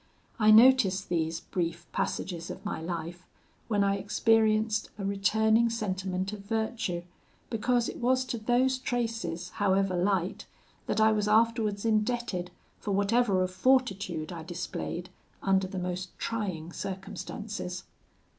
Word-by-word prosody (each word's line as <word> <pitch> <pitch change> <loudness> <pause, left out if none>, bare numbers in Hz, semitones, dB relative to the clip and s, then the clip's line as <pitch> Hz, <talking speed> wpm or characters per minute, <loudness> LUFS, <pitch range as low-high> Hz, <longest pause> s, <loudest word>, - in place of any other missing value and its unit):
I 215 -1 +5
notice 220 -3 +7
these 165 -3 -2
brief 170 -2 -3
passages 170 -3 -3
of - - -8
my 200 - -3
life 170 +1 -5 0.4
when 205 -3 +2
I 200 0 +2
experienced 215 +1 +2
a 200 - -4
returning 220 +3 +3
sentiment 190 -3 -2
of 210 - -6
virtue, 220 -4 -2 0.5
because 240 +1 +1
it - - -5
was 255 +1 +2
to 240 -2 -3
those 250 +4 +2
traces, 225 -9 -2
however 195 -1 +1
light, 185 0 0 0.4
that - - 0
I 220 0 +6
was 210 -1 +1
afterwards 220 -1 +2
indebted 215 -4 0 0.3
for 205 - -3
whatever 200 -1 +2
of 185 - -2
fortitude 195 -8 +1
I 170 -2 -6
displayed 175 +1 -5 0.3
under 190 -1 +2
the 190 - -6
most 180 0 -4
trying 185 -8 -3
circumstances. 195 0 -5
200 Hz, 130 wpm, -29 LUFS, 180-225 Hz, 0.5 s, notice